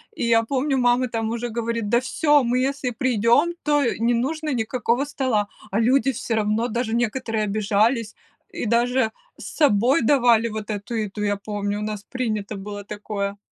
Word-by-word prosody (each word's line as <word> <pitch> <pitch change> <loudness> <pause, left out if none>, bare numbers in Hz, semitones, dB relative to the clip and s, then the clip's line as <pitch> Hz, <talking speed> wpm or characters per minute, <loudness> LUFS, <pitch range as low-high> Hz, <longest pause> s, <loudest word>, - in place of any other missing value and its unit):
И - - -2
я 230 -1 +4
помню, 270 +3 0
мама 245 0 +2
там 225 -1 -2
уже 235 +1 -3
говорит: 230 -1 -2
"Да 235 +2 +4
всё, 290 +2 +2
мы 245 +1 +1
если 270 0 -1
придем, 245 +7 +2
то 295 -1 +2 0.2
не 235 +2 +2
нужно 300 +5 -1
никакого 240 +2 0
стола". 255 -7 -1 0.2
А 200 - +1
люди 265 +4 +3
всё 230 -1 -3
равно, 215 +2 +1
даже 235 -1 -2
некоторые 230 -1 -1
обижались 215 +2 +1 0.4
и - - -4
даже 235 +1 +2 0.3
с - - -10
собой 260 -3 +4
давали 235 -3 +4
вот 215 -1 -6
эту 205 +2 -4
еду, 210 -2 -3
я 205 0 +1
помню, 205 0 -3
у - - -5
нас 210 -1 -4
принято 215 -5 -3
было 205 +1 -7
такое. 205 -1 -4
230 Hz, 175 wpm, -23 LUFS, 210-255 Hz, 0.4 s, я